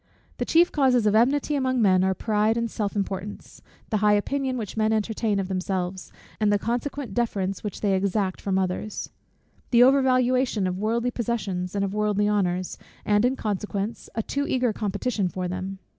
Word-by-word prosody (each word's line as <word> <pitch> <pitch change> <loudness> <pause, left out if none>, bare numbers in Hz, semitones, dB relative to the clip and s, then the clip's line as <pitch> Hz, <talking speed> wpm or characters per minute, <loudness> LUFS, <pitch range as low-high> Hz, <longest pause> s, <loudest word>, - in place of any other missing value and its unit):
The - - -2
chief 340 +2 +4
causes 255 -5 +3
of 210 - +3
enmity 270 +7 +3
among 260 -3 +1
men 185 -4 +4
are, 190 0 +1
pride 215 +2 +1
and 235 -1 -1
self 205 -2 -3
importance, 200 0 -5 0.3
the 215 - +2
high 210 0 +4
opinion 260 +5 -1
which 215 -4 -5
men 220 0 +1
entertain 220 -1 0
of 190 - -2
themselves, 185 -1 -3 0.3
and 210 -1 +3
the 205 - +4
consequent 245 +5 -3
deference 195 -5 -1
which 210 - -5
they 200 -2 +2
exact 190 0 0
from 195 -1 0
others: 190 +3 -3 0.6
the 240 -1 +6
over 270 +2 +6
valuation 255 -4 +2
of 185 0 -2
worldly 230 +4 0
possessions 205 -6 -3
and 200 0 +1
of 195 - -4
worldly 210 -1 +1
honours, 185 -3 0 0.3
and 210 +1 +3
in 255 +2 +2
consequence, 210 0 -3
a 225 - -1
too 285 +5 -2
eager 250 -3 +1
competition 205 0 -1
for 180 0 -3
them. 185 +2 -4
210 Hz, 180 wpm, -25 LUFS, 195-240 Hz, 0.6 s, the